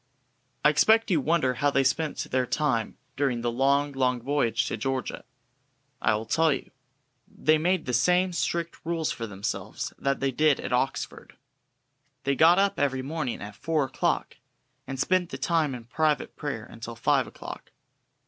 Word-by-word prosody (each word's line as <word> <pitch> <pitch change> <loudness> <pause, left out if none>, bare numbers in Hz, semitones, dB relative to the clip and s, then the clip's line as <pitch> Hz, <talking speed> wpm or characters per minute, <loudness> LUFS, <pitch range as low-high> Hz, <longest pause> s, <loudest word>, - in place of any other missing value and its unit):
I - - +9
expect 220 +9 +4
you 160 -5 +3
wonder 145 -3 +2
how 145 +4 +1
they 135 -1 +2
spent 150 +4 0
their 130 -1 +1
time 120 -8 0 0.2
during 135 -4 0
the 120 0 0
long, 140 +3 +2
long 130 -2 +1
voyage 135 -1 0
to - - -2
Georgia. 130 +3 -3 0.8
I 110 - +3
will 110 +1 -4
tell 160 +8 +3
you. - - -3 0.6
They 155 0 +2
made 180 +1 +1
the 125 - -3
same 180 +9 +3
strict 170 -1 -2
rules 165 -1 -1
for 115 - -4
themselves 100 -1 -4
that 140 0 0
they 135 0 0
did 150 +1 +3
at - - -4
Oxford. 125 +2 -2 0.9
They 140 - +1
got 165 +5 +6
up 200 0 +2
every 135 -2 0
morning 140 -5 -3
at 100 0 -8
four 160 +3 0
o'clock, 135 - -1 0.5
and 135 -1 -5
spent 180 +4 +2
the - - -5
time 160 -6 +1
in 120 - -8
private 150 +3 0
prayer 135 -7 -4
until 115 0 -9
five 115 - +2
o'clock. - - -9
140 Hz, 165 wpm, -27 LUFS, 125-160 Hz, 0.9 s, I